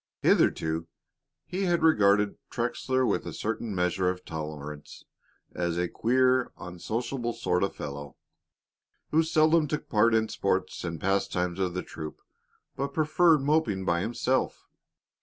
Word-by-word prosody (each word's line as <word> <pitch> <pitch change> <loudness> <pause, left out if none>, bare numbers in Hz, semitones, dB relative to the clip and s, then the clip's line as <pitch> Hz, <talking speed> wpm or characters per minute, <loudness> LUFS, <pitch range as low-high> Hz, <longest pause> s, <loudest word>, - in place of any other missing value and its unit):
Hitherto 80 +1 +2 0.6
he 190 +2 -2
had 175 -2 +1
regarded 105 -9 +4
Trexler 130 +2 0
with - - 0
a - - -5
certain 110 -1 -3
measure 90 +1 +1
of 90 0 -5
tolerance 75 -2 -7 0.5
as 85 -1 -1
a 90 0 +1
queer, 130 +4 +2
unsociable 120 +7 -3
sort 90 -6 0
of 100 - -1
fellow, 70 -1 -7 1.0
who 160 - +5
seldom 160 0 +3
took 150 +1 -4
part 115 +1 +4
in 110 0 +3
the - - -9
sports - - -1
and 85 -1 -4
pastimes 95 -2 0
of 90 -2 -1
the 90 - -2
troop, 75 0 -8 0.6
but 140 +1 -3
preferred 155 -1 +4
moping 130 -11 +1
by 85 -1 +1
himself. 120 +5 -1
105 Hz, 140 wpm, -28 LUFS, 90-130 Hz, 1.0 s, who